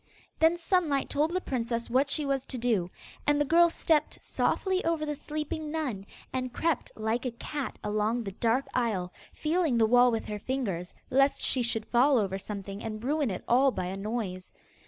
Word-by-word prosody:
Then 325 +2 +4
Sunlight 335 -5 +1
told 300 +2 +2
the 365 +2 0
princess 235 -6 -2
what 265 +4 +2
she 300 +1 +1
was 275 -2 0
to 260 - -4
do, 225 -7 +1 0.4
and 295 0 +4
the 295 - +3
girl 340 +3 +5
stepped 320 -2 +1
softly 380 -1 0
over 330 -2 0
the 300 - -2
sleeping 305 +1 -4
nun, 265 -11 -3 0.3
and 255 -1 -2
crept 325 +1 -1
like 220 +2 -1
a 255 - -1
cat 280 +3 -5
along 215 +3 0
the 195 - -5
dark 230 +6 +1
aisle, 200 -8 -1 0.2
feeling 315 -5 +1
the 225 - +5
wall 245 +2 +6
with 225 - -2
her 210 0 -4
fingers, 200 -9 -3 0.2
lest 275 +2 +3
she 260 - +2
should 230 -2 -1
fall 260 +3 +4
over 195 -3 0
something 200 0 -6
and 215 0 -5
ruin 290 0 +1
it 185 - -4
all 260 +3 +5
by 185 -8 -3
a 185 +2 -4
noise. 195 -3 -4
250 Hz, 190 wpm, -29 LUFS, 215-295 Hz, 0.4 s, wall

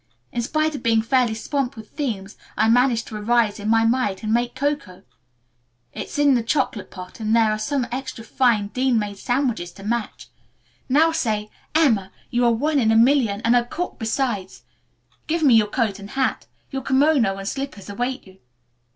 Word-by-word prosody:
In 240 - -2
spite 310 +5 0
of 285 - -5
being 225 -1 +2
fairly 245 -2 +2
swamped 275 +3 -2
with 220 -1 -11
themes, 215 -9 -4 0.2
I 220 - +3
managed 240 0 +3
to 220 - -7
arise 225 0 +1
in 205 +1 -3
my 225 0 +4
might 225 -5 0
and 215 0 0
make 240 +1 0
cocoa. 260 -10 -3 0.9
It's - - -6
in 290 -1 +4
the 245 - +2
chocolate 230 -3 -1
pot 185 +2 -10
and 220 0 +1
there 225 -2 +4
are 215 - -2
some 260 +3 -1
extra 255 -2 -5
fine 225 -3 +1
Dean 255 +1 +1
made 205 -2 -3
sandwiches 245 -8 -1
to 195 - -13
match. 230 +1 -3 0.6
Now 315 +5 +4
say, 215 -9 -1 0.2
'Emma, 225 -12 +3 0.2
you 245 0 +1
are 235 - +5
one 290 +6 +1
in 220 -3 +3
a - - +3
million, 230 -3 +3
and 230 +1 +3
a 240 - +4
cook 350 +9 -5
besides.' 225 -4 -2 0.6
Give 325 +1 0
me 270 -5 +6
your 220 -2 +5
coat 210 -3 -1
and 200 0 -10
hat. 265 +2 -1 0.2
Your 270 -1 -3
kimono 265 -6 +3
and 195 0 -6
slippers 270 -6 -5
await 245 +6 -3
you." 190 0 -17
235 Hz, 185 wpm, -22 LUFS, 215-265 Hz, 0.9 s, me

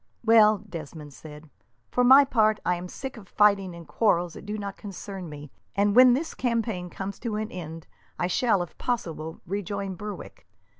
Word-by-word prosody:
"Well," 215 -2 +5
Desmond 155 -4 -8
said, 150 +1 -12 0.4
"for 250 - +2
my 265 +3 +8
part, 215 -5 +2
I 180 - +2
am 175 +1 -5
sick 265 +7 -7
of 200 -5 -13
fighting 200 -4 +3
in 170 -1 -10
quarrels 175 -6 +1
that - - -11
do 210 +1 -3
not 200 -2 -5
concern 195 -3 -8
me, 150 -1 -10 0.2
and 200 +1 +2
when 255 0 +8
this 315 +6 -2
campaign 225 -7 -2
comes 195 +2 -6
to 230 -3 -3
an 215 +1 -3
end 165 -2 -7 0.3
I - - 0
shall, 195 +1 +2
if 175 - -12
possible, 165 -9 -3
rejoin 200 +1 -3
Berwick. 210 +3 -9
200 Hz, 180 wpm, -26 LUFS, 175-220 Hz, 0.4 s, my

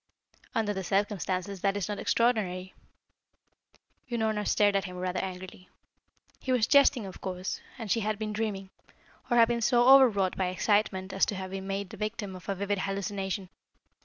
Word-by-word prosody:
"Under 215 -2 +1
the 190 -1 -4
circumstances, 195 0 -1
that 200 0 +1
is 200 - -2
not 210 -1 -4
extraordinary." 190 -6 0 1.4
Unorna 220 -3 -1
stared 205 -1 +3
at 195 - +1
him 180 -1 -7
rather 180 0 -2
angrily. 185 -1 -7 0.7
He 260 - -3
was 245 -4 +3
jesting, 280 -5 +4
of 190 - -10
course, 185 0 -4 0.2
and 225 -5 -5
she 230 - +3
had 215 -1 -1
been 215 0 -4
dreaming, 205 -3 -3 0.6
or 240 - +3
had 230 -1 +7
been 235 0 -1
so 240 +1 +4
overwrought 230 -9 +6
by 185 - 0
excitement 190 0 0
as 190 - 0
to 205 - -2
have 190 0 -6
been 195 0 -5
made 195 -1 -3
the - - -9
victim 210 -2 -4
of 185 +2 -11
a 195 - 0
vivid 200 +1 -1
hallucination. 195 -1 -3
200 Hz, 175 wpm, -29 LUFS, 190-215 Hz, 1.4 s, had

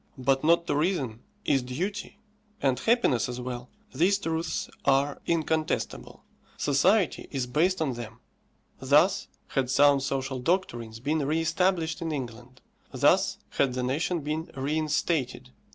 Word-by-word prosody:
But 135 +2 +1
not 170 +2 +4
to - - 0
reason 145 - 0 0.3
is 135 - +3
duty; 180 +13 -4 0.4
and 135 -2 +1
happiness 225 - +2
as 125 0 -5
well. 125 0 -6 0.2
These 195 +4 +3
truths 165 -3 -2 0.2
are 140 +1 +2
incontestable; 160 -1 -1 0.3
society 175 +7 +2
is 135 -3 -2
based 160 +7 +1
on 135 -4 -1
them. 120 -1 -8 0.6
Thus - - +3 0.2
had 130 -2 0
sound 140 +1 +5
social 135 -1 -2
doctrines 120 -8 -1
been 150 +6 0
re 155 +2 +1
established 165 0 0
in 165 -1 -2
England; 125 -2 -6 0.3
thus - - +3
had 130 - +1
the 125 - -1
nation 155 +6 -1
been 155 +3 -3
reinstated. 150 - -1
145 Hz, 135 wpm, -27 LUFS, 130-165 Hz, 0.6 s, sound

